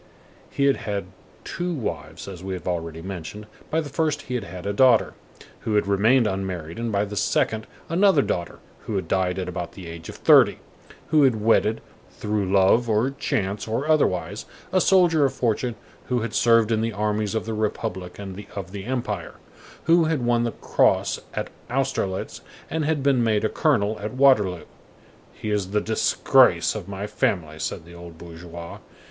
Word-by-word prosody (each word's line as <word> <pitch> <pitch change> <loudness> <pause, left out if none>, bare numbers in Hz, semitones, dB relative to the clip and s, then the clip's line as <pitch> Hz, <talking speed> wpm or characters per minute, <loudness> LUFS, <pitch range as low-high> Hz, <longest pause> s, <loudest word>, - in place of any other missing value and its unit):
_" - - -27 0.5
He 140 - 0
had 140 - +3
had 100 -1 -3 0.4
two 175 0 -3
wives, 80 - -5
as 95 -2 -8
we 95 0 -3
have 90 - -8
already 80 -2 -3
mentioned; 95 +3 -7 0.2
by 160 - +1
the 150 - -7
first 155 +1 -1
he 125 - -6
had 125 - -1
had 90 +2 -9
a 100 - -1
daughter, 125 0 +4 0.5
who 110 - -2
had 105 - +3
remained 110 +6 +3
unmarried, 95 -4 -3
and 115 -1 -2
by 100 0 +1
the 105 0 -7
second 110 +2 0 0.2
another 170 -3 +4
daughter, 85 -1 -3 0.3
who 110 - -2
had 95 -4 -2
died 95 0 0
at 95 - -3
about 85 -1 -5
the 95 - -10
age 85 -1 -8
of - - -8
thirty, - - +5 0.5
who 155 -1 +4
had 130 -6 +4
wedded, 110 0 +2 0.3
through 105 -3 -2
love, 100 +5 +4
or 110 +5 +2
chance, 105 -8 -2
or 115 +7 -2
otherwise, 100 - +1 0.3
a 185 - +4
soldier 175 -6 +4
of 135 - +2
fortune 120 0 0 0.3
who 125 -2 0
had 115 -1 -4
served 115 -1 +4
in 110 -1 +2
the 115 0 -1
armies 105 0 -1
of 110 - -1
the 115 - -3
Republic 105 -4 -3
and 100 0 -7
of 95 -3 -6
the 100 -1 -7
Empire, 125 0 -3 0.5
who 165 0 +4
had 155 -6 0
won 120 0 +2
the 115 - -1
cross - - +1 0.2
at - - -3 0.2
Austerlitz 125 -7 -2 0.3
and 160 -1 -1
had 150 -3 0
been 135 -3 +3
made 110 -2 +1
colonel 110 -9 +1
at 105 +1 -5
Waterloo. 105 -11 +4 0.7
_"He 110 - -4
is 100 -3 -1
the 105 +1 +1
disgrace 110 +1 +3
of - - -6
my 100 0 -5
family," 80 -6 -1
_ - - -8
said 80 - -4
the 85 - -13
old 85 -1 -11
bourgeois. 85 0 -9
105 Hz, 185 wpm, -24 LUFS, 95-125 Hz, 0.7 s, thirty